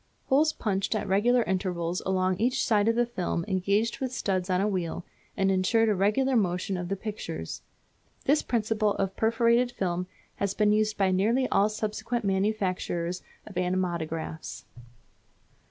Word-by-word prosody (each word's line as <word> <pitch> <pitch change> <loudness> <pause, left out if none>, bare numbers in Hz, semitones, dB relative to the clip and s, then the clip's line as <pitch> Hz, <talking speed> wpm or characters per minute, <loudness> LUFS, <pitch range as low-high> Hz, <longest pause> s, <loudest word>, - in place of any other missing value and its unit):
Holes 300 +4 +4
punched 195 -4 -1
at 215 - -2
regular 235 +6 +3
intervals 180 -3 -1
along 185 -1 +1
each 250 +4 +1
side 210 -2 +3
of 230 - +3
the 240 0 +3
film 180 -7 -2
engaged 200 +4 0
with 260 -2 -2
studs 190 -6 -1
on 180 0 +2
a 200 - +2
wheel, 180 -3 -2 0.3
and 195 0 +2
insured 220 +4 +3
a - - +3
regular 235 +8 +2
motion 185 -2 0
of 175 -1 -4
the 195 - 0
pictures. 190 - -6 0.6
This 290 +3 +4
principle 220 -2 0
of 195 -1 0
a - - -27
perforated 235 +3 +2
film 180 -4 -2 0.3
has 200 -1 -1
been 210 -1 +3
used 215 0 +1
by 195 -2 +2
nearly 225 +8 +2
all 205 +2 +3
subsequent 215 +2 -3
manufacturers 190 -3 -1 0.2
of 210 - -10
animatographs. 170 -3 -2
200 Hz, 155 wpm, -28 LUFS, 185-225 Hz, 0.6 s, Holes